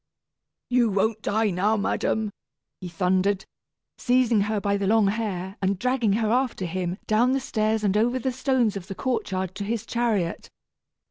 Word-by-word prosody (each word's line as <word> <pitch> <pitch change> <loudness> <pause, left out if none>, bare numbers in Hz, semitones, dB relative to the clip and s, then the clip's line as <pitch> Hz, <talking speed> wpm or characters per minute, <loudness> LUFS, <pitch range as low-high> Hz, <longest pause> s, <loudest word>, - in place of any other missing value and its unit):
"You 245 -2 +4
won't 215 +2 0
die 220 0 +1
now, 205 +5 +1
madam," 215 +1 -1 0.5
he 185 - -7
thundered, 185 +3 +1 0.5
seizing 245 -3 +3
her 210 +1 0
by 200 0 0
the 200 -1 -1
long 215 -1 +4
hair, 195 -3 -3
and 195 0 +1
dragging 245 -1 +1
her 220 0 +1
after 250 -6 0
him 180 +1 -3
down 235 +4 +3
the 270 - +1
stairs 220 -3 -1
and 200 -1 +1
over 240 +4 +2
the 255 +1 -1
stones 255 -4 +1
of 190 -2 -6
the 195 - -6
courtyard 190 -7 -2
to 200 - -5
his 225 +1 -3
chariot. 225 -9 -1
215 Hz, 165 wpm, -25 LUFS, 195-235 Hz, 0.5 s, You